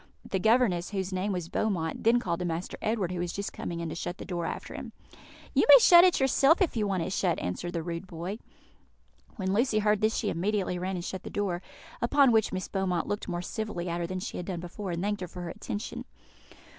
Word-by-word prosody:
The 190 - -1
governess, 220 -5 +3
whose 190 -2 -3
name 190 +3 -1
was 180 -3 -3
Beaumont, 170 -4 -1
then 230 +2 +5
called 170 -6 -2
to 180 - -2
Master 170 +1 -3
Edward, 215 -5 0
who 180 - -3
was 175 0 -2
just 200 +2 -4
coming 170 -1 -4
in, 165 - -3
to - - -4
shut 175 +2 -4
the - - -8
door 175 -3 -3
after - - -5
him. - - -7 0.6
"You - - +4
may - - +12
shut 350 -6 +8
it 365 -1 +4
yourself, 275 +4 +4
if 370 -9 +1
you 215 -2 +1
want 190 -4 0
it 185 - -3
shut," 180 -3 +1
answered 130 - -4
the 165 -2 -2
rude 170 +2 -5
boy. 180 +5 -5 1.0
When 190 -3 -1
Lucy 230 +1 +2
heard 210 -1 +2
this 215 +1 +2
she 210 - 0
immediately 185 0 -1
ran 185 +1 -2
and 175 -1 -4
shut 190 -2 -5
the - - -8
door, 190 -4 -2 0.4
upon 270 +2 +5
which 220 -2 +3
Miss 185 - -3
Beaumont 185 -3 -1
looked 205 - -3
more 175 -2 -3
civilly 195 -4 -4
at 170 +1 -2
her 170 - -2
than 185 +1 -3
she - - -5
had 175 - -5
done 180 -3 -3
before, 185 +3 -6
and 170 +1 -2
thanked 205 -1 -1
her 180 - -3
for 180 +1 -8
her 170 - -5
attention. 205 +5 -5
190 Hz, 240 wpm, -29 LUFS, 175-215 Hz, 1.0 s, may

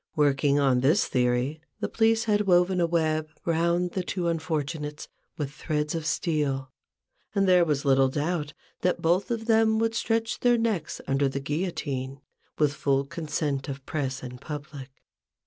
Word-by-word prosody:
Working 145 -1 +3
on 135 -3 +3
this 150 +10 +3
theory, 125 +4 0 0.2
the - - -1
police 225 0 +2
had 210 -2 +1
woven 180 0 +4
a 170 - +3
web 155 -2 0 0.2
round 170 +1 +1
the 185 - -2
two 180 -1 -2
unfortunates 155 -2 -3 0.3
with 145 -3 -3
threads 150 +1 -2
of 165 -2 -3
steel; 140 -6 -1 0.6
and 195 -1 +3
there 180 -1 +6
was 150 -3 0
little 135 -1 +4
doubt, 150 +2 -2 0.3
that 180 0 0
both 175 +7 +2
of 230 -2 -2
them 220 -1 +4
would 225 0 +1
stretch 225 0 -1
their 245 -1 +4
necks 220 -9 -1
under 135 0 +1
the 135 - -3
guillotine, 140 -3 -3 0.4
with 150 -2 +2
full 140 -1 +1
consent 145 -2 -3
of 135 0 -6
press 135 -4 -3
and 125 0 -8
public. 145 -2 -7
155 Hz, 160 wpm, -27 LUFS, 140-180 Hz, 0.6 s, there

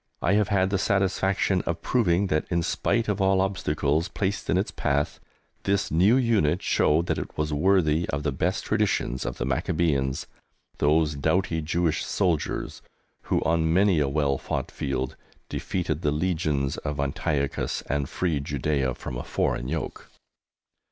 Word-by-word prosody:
I 90 - +1
have 105 -1 +3
had 95 -2 +2
the 95 - +1
satisfaction 95 -1 +1
of 85 0 -2
proving 100 -6 +2
that, 75 -5 0
in 85 -1 +1
spite 115 +6 0
of 105 -1 0
all 95 0 +3
obstacles 80 -5 0
placed 100 0 -3
in 90 - +3
its 95 - 0
path, 70 0 -1 0.4
this 100 0 0
new 95 - +5
unit 105 - +2
showed 80 +3 +2
that - - -1
it - - -7
was 75 0 -1
worthy 85 0 +2
of 70 +1 -2
the 75 - 0
best 65 - -1
traditions 65 0 0
of - - -4
the - - -2
Maccabæans, 70 0 0 0.5
those 75 +1 +3
doughty 80 +3 0
Jewish 80 +1 0
soldiers 90 -6 -1 0.4
who, - - +1
on 80 -1 +2
many 95 -1 +4
a 70 -2 +1
well 70 -2 +1
fought - - -3
field, 65 -1 -3 0.3
defeated - - -2
the 75 - +1
legions 75 -3 0
of 75 -2 -4
Antiochus 70 0 -1
and 70 -1 -2
freed 80 -6 -1
Judæa 70 -2 -1
from 60 - -6
a - - -4
foreign - - -1
yoke. - - -4
80 Hz, 160 wpm, -26 LUFS, 70-95 Hz, 0.5 s, new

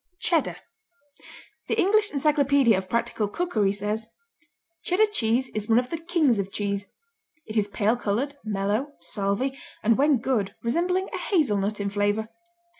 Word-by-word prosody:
Cheddar 335 -3 +1 1.1
The - - 0
English 420 +3 +3
Encyclopedia 280 -4 +3
of 185 0 -4
Practical 230 -2 0
Cookery 215 - 0
says: 210 +2 -3 0.8
Cheddar 380 +5 +3
cheese 245 - +1
is 215 0 -5
one 225 - +5
of 250 0 0
the 330 - -2
kings 320 - +2
of 195 0 -3
cheese; 200 0 -2 0.6
it 215 - -7
is 210 -2 +2
pale 210 +2 +1
coloured, 245 +5 -1
mellow, 215 +7 -1
salvy, 200 +9 -1 0.3
and, 230 +3 +3
when 290 -1 +4
good, 225 -5 -1
resembling 355 +10 0
a - - -3
hazelnut 210 - +1
in 200 0 -2
flavour. 205 +2 0
230 Hz, 145 wpm, -25 LUFS, 205-290 Hz, 1.1 s, one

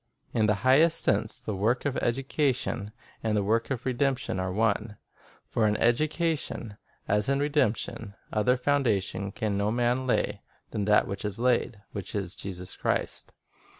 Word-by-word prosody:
In 110 -2 +3
the 105 - +3
highest 160 +6 +5
sense, - - +1
the 110 - -4
work 110 +8 0
of 145 - 0
education 130 -4 0 0.3
and 110 -1 0
the 100 - +1
work 115 +3 +1
of 130 -3 -3
redemption 130 -3 0
are 95 0 -1
one; 105 +1 0 0.5
for 110 - +1
in 105 0 +1
education, 150 -3 0 0.3
as 105 +4 +1
in 140 - +3
redemption, 120 -7 0 0.2
"other 110 +4 +3
foundation 115 -8 0
can 105 -2 -2
no 100 +1 +1
man 120 +2 +1
lay 125 - 0 0.3
than 105 - -2
that 105 0 +4 0.2
is 105 -1 -3
laid, 120 -3 +1
which 100 -1 -6
is 95 -3 -2
Jesus 90 -2 -6
Christ." - - -2
115 Hz, 150 wpm, -28 LUFS, 105-130 Hz, 0.5 s, highest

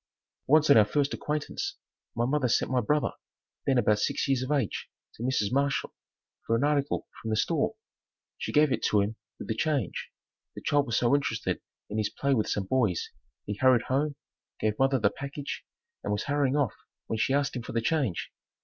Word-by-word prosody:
Once 155 +2 +5
on - - +8
our 110 - +8
first 140 +7 0
acquaintance, 150 0 -3 0.4
my 120 - +1
mother 130 -1 +1
sent 125 - +1
my 125 -1 +3
brother, 150 +6 +1 0.6
then 135 -2 +4
about 105 -3 +3
six - - 0
years 135 -2 +2
of 130 +3 -3
age, 135 -8 -1 0.2
to - - -13
Mrs. 120 -4 +1
Marshall 140 +1 0 0.5
for 115 - +1
an 115 - +1
article 145 -1 +1
from 110 - -4
the 110 - +1
store. - - +1 0.6
She - - -3
gave 150 -1 +4
it - - 0
to 105 - +4
him 105 +3 -1 0.2
with - - -8
the 110 - 0
change. 135 - -1 0.5
The - - -7
child 145 -1 +3
was 115 - +1
so 120 +1 +3
interested 140 -6 0 0.3
in 105 +1 -3
his 105 - +1
play 140 0 0
with 110 -5 +1
some 100 - -1
boys, 110 -6 +1 0.3
he 105 - -2
hurried 130 -2 +5
home, 145 +3 +1 0.4
gave 110 -1 0
mother 135 0 +4
the 105 -4 +2
package 140 +1 -6 0.4
and 100 - -2
was 105 0 0
hurrying 140 -2 +1
off 145 -7 +1 0.3
when 110 - -3
she 135 - +2
asked 140 -2 0
him 125 - -2
for 125 +2 -7
the 115 - +2
change. 120 - 0
130 Hz, 200 wpm, -28 LUFS, 110-140 Hz, 0.6 s, on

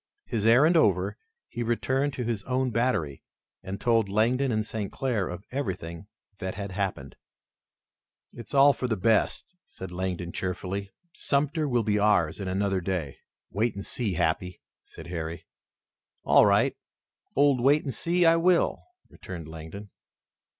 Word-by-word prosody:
His 110 -1 -1
errand 140 +9 +6
over, 160 - +3 0.3
he - - -6
returned 130 +4 0
to 125 - -3
his 115 -3 -2
own 130 0 0
battery 110 - 0 0.4
and 95 0 -6
told 115 -4 +2
Langdon 120 +6 +2
and 110 -1 0
St. 105 -3 -4
Clair 120 -8 -1
of 90 +2 -7
everything 95 - -4 0.3
that 95 -2 -4
had 100 -1 -5
happened. 90 -9 -3 1.2
"It's 120 +2 -9
all 140 +1 +7
for 125 - -3
the 110 -3 -1
best," 110 - +1
said 95 -1 -9
Langdon 90 -1 -3
cheerfully. 95 +2 -4 0.2
"Sumter 150 +2 0
will 120 -2 +2
be 105 -1 +1
ours 100 -6 +2
in 95 - -4
another 95 0 0
day." 85 -7 -3 0.3
"Wait 110 +3 0
and 100 - -6
see, 110 -8 -2
Happy," 90 +3 -1 0.2
said - - -12
Harry. 85 -1 -5 0.8
"All - - +6
right, - - +3 0.6
old 140 -2 +4
Wait 145 +4 +4
and 135 - -4
See, 175 +1 +1
I 165 0 +6
will," 175 +1 +2 0.3
returned 85 -4 -9
Langdon. 80 +6 -9
105 Hz, 150 wpm, -27 LUFS, 95-130 Hz, 1.2 s, all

